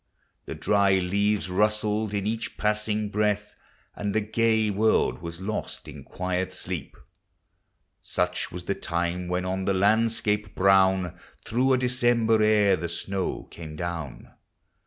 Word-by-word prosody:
The -, -, -6 dB
dry 100 Hz, -2 st, +3 dB
leaves 100 Hz, +2 st, +1 dB
rustled 105 Hz, +2 st, +1 dB
in 100 Hz, -1 st, -2 dB
each 110 Hz, +1 st, -3 dB
passing 105 Hz, 0 st, 0 dB
breath, 105 Hz, 0 st, 0 dB, 0.4 s
And 100 Hz, 0 st, -3 dB
the -, -, +4 dB
gay 110 Hz, 0 st, +1 dB
world 110 Hz, +2 st, +2 dB
was 85 Hz, 0 st, -7 dB
lost 105 Hz, +3 st, -4 dB
in -, -, -9 dB
quiet 90 Hz, 0 st, -3 dB
sleep. 90 Hz, -3 st, -5 dB, 1.0 s
Such 90 Hz, 0 st, -2 dB
was 90 Hz, 0 st, -7 dB
the 100 Hz, -, -1 dB
time 85 Hz, 0 st, -2 dB
when, 90 Hz, +1 st, -1 dB
on 95 Hz, +1 st, -2 dB
the 100 Hz, -, +1 dB
landscape 105 Hz, 0 st, +1 dB
brown, 95 Hz, -2 st, +3 dB, 0.3 s
Through 130 Hz, +3 st, +2 dB
a -, -, +4 dB
December 120 Hz, -3 st, +2 dB
air 105 Hz, -2 st, +4 dB
the 85 Hz, +2 st, -4 dB
snow 95 Hz, +3 st, -3 dB
came 80 Hz, -2 st, -9 dB
down. 85 Hz, -5 st, -6 dB
100 Hz, 135 wpm, -26 LUFS, 90-105 Hz, 1.0 s, the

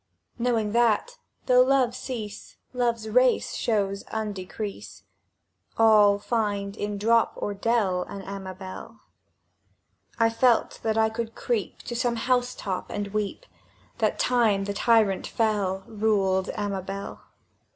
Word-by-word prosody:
— -, -, -53 dB
Knowing 230 Hz, -3 st, +1 dB
that, 240 Hz, -, +1 dB, 0.3 s
though 250 Hz, 0 st, +6 dB
Love 255 Hz, -2 st, +3 dB
cease, 230 Hz, -5 st, -7 dB, 0.2 s
Love's 235 Hz, -3 st, 0 dB
race 250 Hz, +3 st, +3 dB
shows 200 Hz, -3 st, -1 dB
undecrease; 210 Hz, -1 st, -6 dB, 0.7 s
All 210 Hz, -2 st, +6 dB
find 205 Hz, -2 st, -2 dB
in 205 Hz, -1 st, -3 dB
dorp 230 Hz, +3 st, +3 dB
or 205 Hz, -, -3 dB
dell 200 Hz, -3 st, +1 dB
An 200 Hz, -1 st, -7 dB
Amabel. 190 Hz, +2 st, -8 dB, 1.2 s
—I 230 Hz, -1 st, +4 dB
felt 235 Hz, 0 st, +2 dB
that 220 Hz, -1 st, 0 dB
I 220 Hz, 0 st, +4 dB
could 225 Hz, 0 st, -5 dB
creep 225 Hz, -7 st, -3 dB
To 240 Hz, -, -5 dB
some 240 Hz, 0 st, 0 dB
housetop, 245 Hz, -6 st, -1 dB
and 205 Hz, -1 st, -3 dB
weep, 215 Hz, -, -3 dB, 0.5 s
That -, -, +1 dB
Time 225 Hz, -6 st, +2 dB
the 200 Hz, -, -3 dB
tyrant 215 Hz, -3 st, +2 dB
fell 200 Hz, -4 st, 0 dB
Ruled 200 Hz, -3 st, +1 dB
Amabel! 200 Hz, -2 st, -4 dB
215 Hz, 120 wpm, -26 LUFS, 200-235 Hz, 1.2 s, though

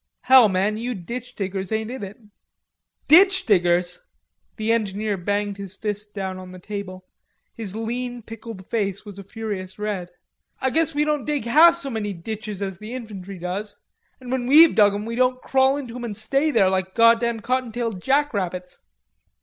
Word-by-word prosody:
Hell, 255 Hz, -4 st, +7 dB
man, 195 Hz, +3 st, 0 dB
you 240 Hz, +2 st, -3 dB
ditch 240 Hz, +7 st, -7 dB
diggers 195 Hz, -1 st, -4 dB
ain't 220 Hz, +1 st, -2 dB
in 260 Hz, -, -6 dB
it." 200 Hz, +1 st, -8 dB, 0.9 s
"Ditch 375 Hz, +3 st, +6 dB
diggers!" 180 Hz, -, +1 dB, 0.5 s
The 220 Hz, +1 st, -1 dB
engineer 210 Hz, -2 st, 0 dB
banged 205 Hz, +2 st, -2 dB
his 200 Hz, -1 st, -8 dB
fist 210 Hz, -1 st, -5 dB
down 190 Hz, -2 st, -4 dB
on 185 Hz, 0 st, -10 dB
the 185 Hz, -, -10 dB
table. 185 Hz, -1 st, -7 dB, 0.5 s
His 210 Hz, -4 st, -6 dB
lean 240 Hz, +2 st, -4 dB
pickled 225 Hz, -3 st, -9 dB
face 200 Hz, -3 st, -2 dB
was 200 Hz, -1 st, -10 dB
a -, -, -8 dB
furious 200 Hz, -2 st, -6 dB
red. 205 Hz, -4 st, -3 dB, 0.5 s
"I 265 Hz, -, 0 dB
guess 320 Hz, +2 st, +1 dB
we 300 Hz, +1 st, +2 dB
don't 300 Hz, -3 st, -1 dB
dig 295 Hz, -5 st, -2 dB
half 320 Hz, +8 st, +7 dB
so 280 Hz, -5 st, -3 dB
many 210 Hz, -3 st, -3 dB
ditches 210 Hz, +2 st, -6 dB
as 190 Hz, -3 st, -5 dB
the 215 Hz, +4 st, -7 dB
infantry 200 Hz, -6 st, -8 dB
does... 190 Hz, +4 st, -5 dB, 0.4 s
an' 250 Hz, -1 st, -8 dB
when 255 Hz, -2 st, -1 dB
we've 315 Hz, +4 st, +8 dB
dug 205 Hz, -2 st, +4 dB
'em 205 Hz, +1 st, -4 dB
we 230 Hz, -, -4 dB
don't 255 Hz, +1 st, +2 dB
crawl 265 Hz, +1 st, +2 dB
into 250 Hz, -5 st, -7 dB
'em 250 Hz, -, -6 dB
an' 215 Hz, -3 st, -5 dB
stay 275 Hz, +8 st, +1 dB
there 200 Hz, -9 st, +3 dB
like 190 Hz, 0 st, -2 dB
goddam 230 Hz, 0 st, +4 dB
cottontailed 235 Hz, -4 st, -2 dB
jackrabbits." 195 Hz, -11 st, -1 dB
215 Hz, 175 wpm, -23 LUFS, 195-250 Hz, 0.9 s, we've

